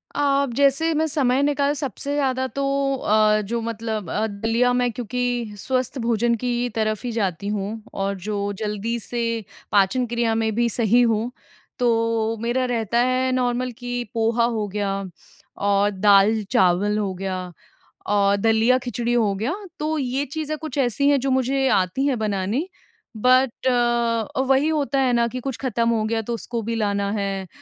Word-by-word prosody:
अ, 280 -1 +2
जैसे 280 +4 +3
मैं 315 +1 +1
समय 270 -3 +1
निकाल 285 0 +1
सबसे 280 -1 -4
ज़्यादा 260 -2 0
तो 275 +1 -4 0.3
अ, 215 -3 +3
जो 230 +3 -3
मतलब 225 -3 -4
अ, 215 - 0
दलिया, 225 +4 +1
मैं 245 -1 +1
क्योंकि 240 -1 -3
स्वस्थ 255 +5 -2
भोजन 235 0 +1
की 245 0 0
तरफ 215 0 -1
ही 245 - -2
जाती 200 -4 -2
हूँ 205 -1 -2 0.2
और 195 0 -2
जो 205 -1 -2
जल्दी 210 +3 -2
से 240 +2 -4 0.5
पाचन 205 +6 +3
क्रिया 235 -1 0
में 225 0 0
भी 235 +1 +2
सही 235 +1 +3
हो। 230 0 +1 0.5
तो 230 -2 +1
मेरा 240 +2 0
रहता 230 +1 0
है 255 0 +1
नॉर्मल 250 0 0
कि 245 -1 -3
पोहा 230 +1 +1
हो 210 -1 -1
गया 195 -1 -2 0.6
और 200 0 +3
दाल-चावल 200 -1 +3
हो 200 -3 -1
गया 185 -1 -4 0.6
और 200 -1 +3
दलिया-खिचड़ी 240 +3 +1
हो 220 -4 +2
गया। 225 +10 -2 0.3
तो 310 +1 -1
ये 270 0 -1
चीज़ें 310 +2 -4
कुछ 310 -1 -7
ऐसी 275 +2 +2
हैं 285 -1 +4
जो 270 +1 -1
मुझे 265 +1 +1
आती 190 +8 +1
हैं 270 -3 +1
बनानी 210 - -1 0.5
बट 255 +2 +2
अ, 240 -2 +1
वही 270 +3 +3
होता 285 -4 0
है 255 -2 +2
ना 235 -1 +3
कि 255 +2 -5
कुछ 260 -1 -4
खत्म 235 -3 0
हो 225 -2 +1
गया 225 +1 0
तो 235 +2 -4
उसको 235 0 -4
भी 230 +2 -2
लाना 200 -2 0
है, 195 -2 -2
235 Hz, 165 wpm, -22 LUFS, 210-255 Hz, 0.6 s, हैं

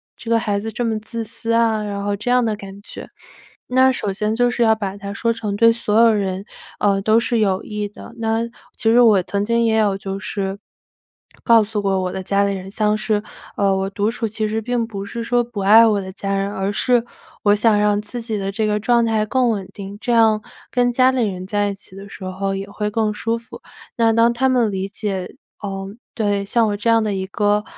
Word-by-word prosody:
这 230 - -7
个 230 - +4
孩 205 -3 -1
子 225 +2 -5
这 240 +3 -3
么 225 -2 0
自 225 +1 -5
私 230 +1 -4
啊？” 225 -2 +2
然 200 -1 -4
后 205 0 -1
这 215 +5 -3
样 250 -1 +4
的 220 -2 0
感 195 0 -11
觉。 - - -10 0.6
那 260 +1 +5
首 210 -5 -2
先 210 +2 -1
就 245 +2 +2
是 240 0 0
要 220 -1 +5
把 200 -2 -4
它 200 0 -6
说 230 +3 0
成 215 -3 -3
对 230 +2 +5
所 225 -1 +1
有 230 -1 +6
人， 195 -2 -1 0.4
呃， 200 -1 +2
都 220 +2 +4
是 235 0 0
有 195 -3 +1
益 210 -1 -4
的。 205 - -13
那 225 0 0 0.4
其 225 - +1
实 240 - +5
我 215 -5 +6
曾 200 +3 -2
经 235 +1 +2
也 225 -1 +2
有 210 -3 +2
就 195 0 -5
是， 195 -1 -3 0.9
告 230 -2 +6
诉 210 0 -3
过 195 -2 0
我 180 -1 -2
的 190 - -5
家 200 +1 +1
里 200 - +1
人， 190 +1 -8
像 210 0 +1
是， 215 -1 0 0.4
呃， 195 -1 +2
我 190 0 -1
独 205 +2 0
处 230 0 -2
其 215 0 -2
实 220 +1 -1
并 230 0 -1
不 200 -3 -6
是 230 +3 -5
说 240 +1 +1
不 235 -3 -7
爱 215 +4 +7
我 210 -2 +2
的 190 0 -7
家 195 +1 -3
人， 195 0 -1
而 195 0 -2
是， 240 +1 +2 0.4
我 205 -1 +5
想 210 0 +3
让 210 0 +2
自 215 +3 -6
己 220 -3 -3
的 195 0 -3
这 220 +2 -1
个 210 0 0
状 235 +1 +3
态 220 -1 +1
更 255 0 +2
稳 195 -4 -3
定， 200 0 -8
这 240 - -1
样 220 -2 +4 0.3
跟 245 -1 +2
家 255 +1 +4
里 245 -4 +1
人 185 -2 -5
在 205 +1 0
一 200 - -4
起 190 -1 -13
的 200 +1 -10
时 190 - -9
候 195 +1 -2
也 195 +1 -5
会 210 +1 -3
更 215 0 0
舒 225 +2 -1
服。 230 - -12 0.4
那 225 -1 +4
当 230 +1 +4
他 265 +2 +1
们 240 -4 +2
理 190 0 -3
解 195 -3 -4 0.3
呃， 195 -1 -5 0.3
对， 205 -3 0
像 225 +2 +2
我 205 - -1
这 205 +3 -1
样 225 -1 +4
的 210 - -1
一 190 -1 -3
个， 205 +1 +1
210 Hz, 255 characters per minute, -20 LUFS, 200-230 Hz, 0.9 s, 爱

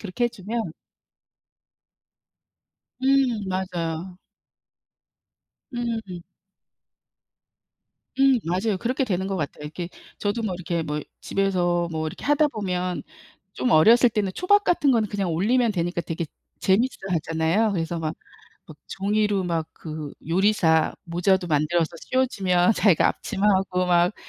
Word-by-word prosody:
그렇게 215 +4 -2
해주면 220 -4 -3 2.3
음 260 -5 +2
맞아요. 180 -1 -3 1.5
음. 225 -7 -4 2.0
음 270 -2 +5
맞아요. 190 +5 0
그렇게 255 +5 0
되는 190 -5 -1
것 195 0 -2
같아요. 150 -3 -4
이렇게 170 +4 -5 0.3
저도 210 +3 -1
뭐 195 -4 -2
이렇게 170 -1 -2
뭐 150 -1 -3 0.2
집에서 175 -3 0
뭐 160 0 -2
이렇게 155 - -7
하다 295 +1 +3
보면 185 -7 -3 0.5
좀 250 - -1
어렸을 230 +9 +6
때는 205 -3 -1
초밥 410 +3 +3
같은 320 -6 +3
거는 225 -4 +2
그냥 195 -3 -2
올리면 225 +8 +2
되니까 175 -1 -1
되게 165 0 -4 0.3
재밌어하잖아요. 190 -2 +1
그래서 170 -2 -2
막 160 -1 -3 0.5
막 155 - -13
종이로 205 0 0
막 165 -3 -1
그 155 -2 -7 0.2
요리사 175 -3 +3
모자도 180 +2 +1
만들어서 160 +2 +1
씌워주면 200 -7 +2
자기가 195 -7 +4
앞치마 195 - -3
하고 190 -2 +2
막 175 +2 +3
190 Hz, 265 characters per minute, -24 LUFS, 170-220 Hz, 2.3 s, 어렸을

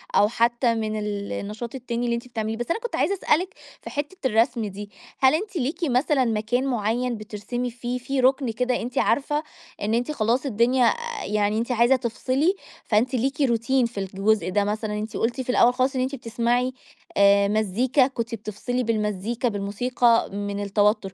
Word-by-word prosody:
أو 205 - +6
حتى 235 +1 +1
من 215 -1 -2
النشاط 210 +3 -4
التاني 240 -2 -3
اللي 235 -1 +1
أنتِ 235 +1 -6
بتعمليه، 225 -2 -3
بس 240 - -3
أنا 390 - 0
كنت 475 0 -4
عايزة 400 - +1
أسألِك 365 -1 +1 0.3
في - - -8
حتّة 290 +6 -4
الرسم 230 0 +2
دي، 205 0 -7 0.3
هل 265 +2 +5
أنتِ 400 +4 -4
ليكِ 310 +3 -2
مثلًا 265 -1 +2
مكان 230 +3 0
معيّن 240 0 0
بترسمي 215 +4 -4
فيه، 240 +1 -4
في 265 +2 -3
ركن 260 -1 +3
كده 250 +2 -1
أنتِ 245 +1 -6
عارفة 285 +6 +1 0.4
إن 210 +2 0
أنتِ 245 +5 0
خلاص 240 0 0
الدنيا 245 +1 +3
أ 475 - -1
يعني 210 0 +1
أنت 235 +3 -1
عايزة 240 +2 +4
تفصلي 260 - 0 0.3
فأنتِ 240 +4 +1
ليكِ 270 +4 -1
روتين 250 0 +2
في 235 -3 -5
الجزء 195 +1 0
ده 205 +1 +2
مثلًا، 210 +1 -2
أنتِ 215 +1 -5
قُلتِ 240 +3 -1
في 255 - -8
الأول 245 0 +5
خالص 255 +2 0
إن 255 - +1
أنت 260 +2 -1
بتسمعي 240 +1 0 0.4
آآ 200 0 +5
مزيكا، 220 +6 +2
كنتِ 235 -3 -4
بتفصلي 220 +4 -3
بالمزيكا 220 +1 -1
بالموسيقى 220 +4 +1 0.2
من 205 0 -3
التوتّر، 205 0 +1
235 Hz, 175 wpm, -24 LUFS, 215-255 Hz, 0.4 s, أو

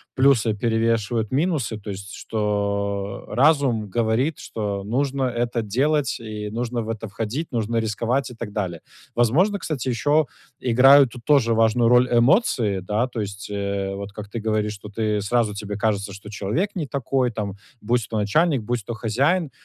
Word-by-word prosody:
плюсы 130 -5 +4
перевешивают 115 0 0
минусы, 140 - 0
то 105 - -9
есть, 100 0 -7
что, 100 -2 -2
э, - - -7
разум 130 -6 +3
говорит, 120 +6 +1
что 100 -3 -4
нужно 135 +5 -1
это 120 -1 -1
делать 135 +7 +1
и 105 -2 -6
нужно 120 +1 -2
в 110 - -6
это 110 0 -4
входить, 115 +10 -4
нужно 115 -1 -1
рисковать 120 +4 -1
и - - -10
так 115 -2 -6
далее. 95 -5 -3 0.4
Возможно, 165 - +3
кстати, 135 -7 -3
ещё 145 +5 +2 0.3
играют 130 +2 +6
тут 125 -2 -11
тоже 135 -6 +4
важную 115 +1 +3
роль 125 +1 +5
эмоции, 120 - +3
да? 105 +6 0
То 120 -3 -4
есть, 100 0 -6
э, 100 -1 -2
вот 100 +1 -6
как 105 0 -9
ты 115 - -4
говоришь 105 -1 -1
тут, 105 0 -12
и 105 -2 0
сразу 110 +1 +1
тебе 105 0 -5
кажется, 105 -2 0
что 100 +1 -10
человек 110 - -2
не 170 -5 -2
такой 130 -2 0
там- 105 -3 -4 0.3
будь 115 +1 0
то 110 - -2
начальник, 140 - +2
будь 120 0 -2
то 120 - -4
хозяин. 140 - +1
115 Hz, 170 wpm, -23 LUFS, 105-130 Hz, 0.4 s, играют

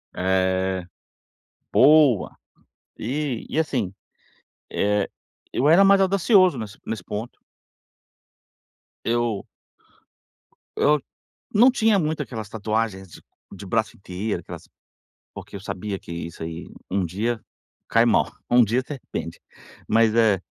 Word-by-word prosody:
É. 95 0 0 0.9
Boa. 145 -6 +5 0.6
E 135 -1 -3
e - - -2
assim, 125 - 0 0.8
eh, 105 0 +1 0.4
eu 140 - +2
era 175 +5 +7
mais 195 0 +6
audacioso, 190 - +4
nesse 110 -1 -7
nesse 110 -5 -4
ponto. 105 +5 -6 1.7
Eu 115 -3 -1 1.3
eu 150 0 +3 0.5
não 240 +5 +7
tinha 225 -5 +3
muito 155 -3 -1
aquelas 110 -6 -6
tatuagens 110 -2 -2
de - - -14 0.3
de 100 0 -10
braço 105 +3 -1
inteiro, 95 +3 -4
aquelas - - -10 0.7
porque - - -9
eu - - -8
sabia 100 +1 -4
que 85 - -10
isso 85 -1 -6
aí, 80 +1 -7 0.2
um 95 0 0
dia, 110 +7 -2 0.5
cai 115 +1 +4
mal, 115 - +2 0.2
um 120 0 +6
dia 115 +4 +1
se - - -7
arrepende. 85 - -6 0.5
Mas 110 0 +4
é 110 -5 +4
110 Hz, 120 wpm, -23 LUFS, 95-145 Hz, 1.7 s, era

